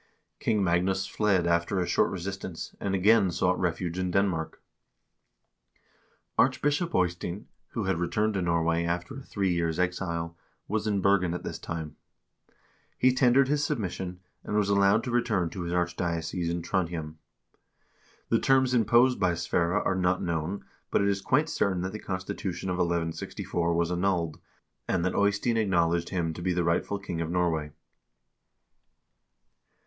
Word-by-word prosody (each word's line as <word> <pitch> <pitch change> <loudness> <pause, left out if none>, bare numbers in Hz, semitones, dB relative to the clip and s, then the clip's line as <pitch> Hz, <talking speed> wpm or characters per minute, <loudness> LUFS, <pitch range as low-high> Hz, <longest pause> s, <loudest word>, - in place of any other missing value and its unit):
King 105 -3 +1
Magnus 95 +2 +1
fled 100 -5 +1
after 85 +3 +1
a 90 - +1
short - - +2
resistance, 95 -2 -6
and 95 -1 -1
again 100 +1 +4
sought 90 +1 +1
refuge 90 0 -1
in 90 -1 -1
Denmark. 90 -4 0 1.8
Archbishop 150 +4 +2
Eystein, 90 +1 -1 0.3
who 115 - -2
had 95 -3 0
returned 105 +5 0
to 95 - -1
Norway 85 -1 +1
after 85 +1 -2
a 135 - -7
three 100 -7 -1
years' 85 -2 0
exile, 85 -2 -2 0.3
was 110 +1 -1
in 100 -2 +1
Bergen 90 -3 +3
at - - -6
this - - -5
time. 80 -3 -6 1.0
He 130 0 +4
tendered 130 +1 +4
his 145 +1 +1
submission, 95 - -3 0.2
and 105 - -3
was 105 -1 +2
allowed 100 +2 +4
to 125 - -3
return 110 -8 +1
to 95 - -6
his 85 0 -3
archdiocese 85 -1 -1
in 85 0 -2
Trondhjem. 85 -4 -2 1.1
The - - +3
terms 130 -1 +3
imposed 120 +2 +4
by 90 -2 +2
Sverre 85 +3 0
are - - +1
not 90 0 +1
known, 85 +3 -3 0.2
but - - +2
it 100 - +2
is 100 -1 0
quite 150 +8 +2
certain 95 - 0
that 95 - -3
the 110 - -6
constitution 95 -1 -4
of 90 - -1
1164 85 0 -1
was 85 0 +1
annulled, 90 -3 0 0.5
and 90 -2 0
that 90 - 0
Eystein 100 +3 +1
acknowledged 85 -5 +1
him 85 -4 -1
to 85 - -8
be 90 +1 0
the 90 0 +1
rightful 85 +4 0
king 90 -4 -4
of 80 - -2
Norway. 85 -4 0
90 Hz, 155 wpm, -28 LUFS, 85-100 Hz, 1.8 s, again